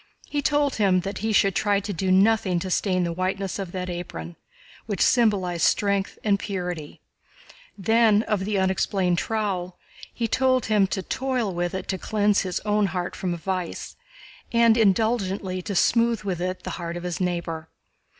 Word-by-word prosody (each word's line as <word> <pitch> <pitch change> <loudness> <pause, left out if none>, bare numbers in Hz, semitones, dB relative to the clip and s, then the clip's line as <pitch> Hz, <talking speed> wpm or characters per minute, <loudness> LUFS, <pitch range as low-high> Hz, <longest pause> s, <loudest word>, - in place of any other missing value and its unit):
He 290 - -2
told 290 -1 +1
him 190 -4 +3
that 195 +3 -5
he 220 +2 -1
should 195 -2 +3
try 205 +1 +2
to 205 +1 -5
do 185 +2 -1
nothing 195 -1 +3
to 185 - -4
stain 185 -1 +1
the 170 -1 -1
whiteness 190 +2 -2
of 190 -3 -5
that 185 -1 -3
apron, 85 - -6 0.5
which 205 -3 -3
symbolized 195 -8 +2
strength 200 -1 0
and 200 -2 +2
purity; 180 -7 -5 0.8
then 220 +1 +4
of 210 -4 -1
the 205 +1 -1
unexplained 190 -1 +1
trowel, 185 -2 -2 0.3
he 230 - -2
told 255 +1 +2
him 210 -3 +3
to 190 0 -3
toil 255 -6 -1
with 175 +1 -2
it 190 - -5
to 190 - -1
cleanse 210 -1 +2
his 185 -2 -2
own 210 -1 +1
heart 180 -1 -3
from 175 -2 -2
vice, 180 0 -4 0.6
and 235 -1 +5
indulgently 195 -3 +1
to 200 +2 -5
smooth 230 +3 +2
with 185 -4 -3
it 185 +1 -3
the - - -4
heart 170 0 -4
of 175 - -7
his 180 0 -3
neighbor. 170 -3 -3
195 Hz, 170 wpm, -24 LUFS, 180-215 Hz, 0.8 s, and